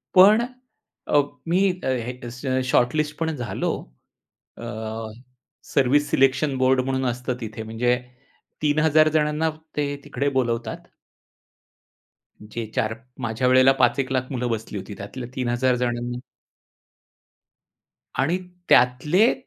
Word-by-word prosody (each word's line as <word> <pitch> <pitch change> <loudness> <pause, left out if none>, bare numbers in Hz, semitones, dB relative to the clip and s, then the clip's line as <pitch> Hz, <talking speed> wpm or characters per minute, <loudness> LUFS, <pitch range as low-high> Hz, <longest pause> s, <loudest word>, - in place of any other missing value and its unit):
पण 205 +5 +8 0.7
अ, 145 - +4 0.3
मी 175 +3 +2 0.2
अ, - - 0 0.2
हे 130 +1 -3
शॉर्टलिस्ट 150 +4 +1
पण 160 -1 0
झालो. 120 -7 -2 0.9
अ, - - -9 1.1
सर्व्हिस 145 +2 +3
सिलेक्शन 135 +1 +2
बोर्ड 130 0 +3
म्हणून 130 0 -1
असतं 125 +1 -3
तिथे 110 0 -6
म्हणजे 115 +3 +1 0.7
3000 155 +1 +4
जणांना 150 +1 +1 0.3
ते 145 -1 0
तिकडे 140 0 -1
बोलवतात. 115 -2 -2 1.7
जे 110 +2 -5
4 110 -4 0 0.3
माझ्या 120 +1 -1
वेळेला 130 +1 +6
5 125 +2 +4
एक 135 0 -2
लाख 130 -1 -1
मुलं 125 -1 -1
बसली 110 -2 -3
होती, 100 +2 -8
त्यातल्या 120 +5 -7
3000 125 -1 +1
जणांना 120 0 -2 2.0
आणि 160 +7 +2 0.3
त्यातले 150 - +4
130 Hz, 110 wpm, -24 LUFS, 120-145 Hz, 2.0 s, पण